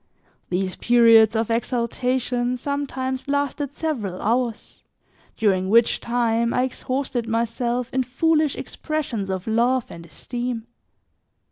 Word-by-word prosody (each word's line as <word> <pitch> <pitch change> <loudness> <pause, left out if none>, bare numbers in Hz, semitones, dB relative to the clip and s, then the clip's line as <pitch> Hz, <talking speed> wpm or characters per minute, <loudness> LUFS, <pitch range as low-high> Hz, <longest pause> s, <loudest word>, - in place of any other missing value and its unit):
These 185 +1 -1
periods 230 -2 +6
of 225 0 0
exaltation 245 +1 -1
sometimes 265 -1 -3
lasted 285 0 -1
several 225 - -3
hours, 235 +1 -2 0.5
during 190 -3 +1
which 230 +2 +4
time, 235 -1 +1
I 250 - +2
exhausted 255 -1 -2
myself 235 +2 -1
in 260 - +2
foolish 305 +4 +1
expressions 270 -11 -4
of 190 -1 -3
love 240 +3 +1
and 170 - -9
esteem. 240 +6 -5
240 Hz, 110 wpm, -23 LUFS, 225-260 Hz, 0.5 s, periods